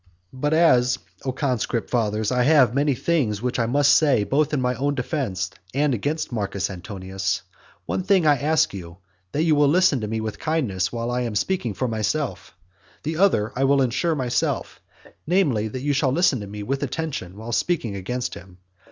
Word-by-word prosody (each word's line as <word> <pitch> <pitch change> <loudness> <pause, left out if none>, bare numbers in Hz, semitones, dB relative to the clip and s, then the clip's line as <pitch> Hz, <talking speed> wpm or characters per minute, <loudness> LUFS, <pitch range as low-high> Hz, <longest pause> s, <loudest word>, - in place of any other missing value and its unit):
V. - - -12
But 145 +2 0
as, 125 -8 +4 0.3
O 130 - 0
conscript 125 -4 -2
fathers, 110 -2 0
I 125 -1 +2
have 130 -3 +5
many 140 0 +2
things 125 -10 0
which 125 +2 -2
I 115 - +1
must 140 +2 +4
say 140 -9 +4
both 140 +6 +1
in 150 - 0
my 125 0 +1
own 140 +3 -1
defence 120 - -2 0.2
and 145 0 +2
against 145 +8 -2
Marcus 100 -4 -2
Antonius, 95 -1 -4 0.4
one - - -1
thing 190 -2 +3
I 145 -2 +5
ask 155 -1 +2
you, 85 -3 -8 0.3
that 150 - 0
you 165 -2 +3
will 145 -1 +4
listen 155 -4 +3
to 105 - -3
me 110 +1 -2
with 110 -1 -5
kindness 120 - -1
while 120 0 -3
I 125 +1 0
am 115 -3 -3
speaking 120 - -1
for 125 - -1
myself; 115 - -3 0.5
the 155 +1 -3
other 140 - +3
I 130 - 0
will 140 0 +4
ensure 130 +7 0
myself, 125 -3 -1 0.5
namely, 150 - +2
that 125 +4 -6
you 145 0 +1
shall 135 -1 +2
listen 155 -3 +2
to 100 - -7
me 105 +1 -7
with 135 +5 -2
attention 135 - -4
while 110 +2 -7
speaking 120 - 0
against 125 +6 -3
him. 95 -2 -12
125 Hz, 195 wpm, -23 LUFS, 110-150 Hz, 0.5 s, have